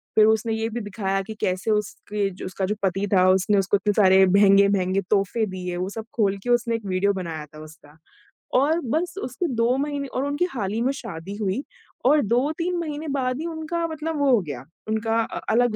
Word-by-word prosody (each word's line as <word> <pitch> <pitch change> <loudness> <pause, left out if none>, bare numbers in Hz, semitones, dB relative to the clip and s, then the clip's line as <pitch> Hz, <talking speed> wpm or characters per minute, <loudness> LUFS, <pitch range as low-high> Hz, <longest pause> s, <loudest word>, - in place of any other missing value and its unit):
फिर 215 - +7
उसने 220 +1 +2
ये 220 0 -1
भी 235 +1 -4
दिखाया 195 -2 -2
कि 220 +3 -7
कैसे 185 +4 0
उसके 210 -1 -1
जो 185 - -9
उसका 190 +1 -3
जो 210 +3 -1
पति 195 +1 +1
था, 185 -1 +5
उसने 190 +2 +3
उसको 195 +1 +2
इतने 205 +2 0
सारे 190 -2 +6
महँगे-महँगे 195 0 +4
तोहफ़े 210 +2 +1
दिए। 180 -2 -5
वो 185 +2 -2
सब 220 +2 -6
खोल 200 -3 +2
के 245 - -4
उसने 240 -1 +2
एक 225 -2 -6
वीडियो 195 +2 +1
बनाया 165 -5 -5
था 155 +1 -14
उसका 155 -1 -16 0.6
और 310 +5 +2
बस 320 +9 -1
उसके 260 +8 -2
2 230 +2 +2
महीने 285 0 -2
और 260 +1 -2
उनकी 290 +5 0
हाल 205 -6 -2
ही 225 - -1
में 255 +3 +2
शादी 195 -6 -7
हुई 210 +5 -1 0.4
और 295 +3 +5
2-3 300 - 0
महीने 310 -1 -4
बाद 255 -1 -1
ही 325 - -4
उनका 335 +1 -3
मतलब 315 0 -4
वो 285 -1 +3
हो 240 - +5
गया। 140 -7 -7 0.2
उनका 225 +1 0
अ, - - -6
अलग 240 0 +3
215 Hz, 210 wpm, -24 LUFS, 190-255 Hz, 0.6 s, फिर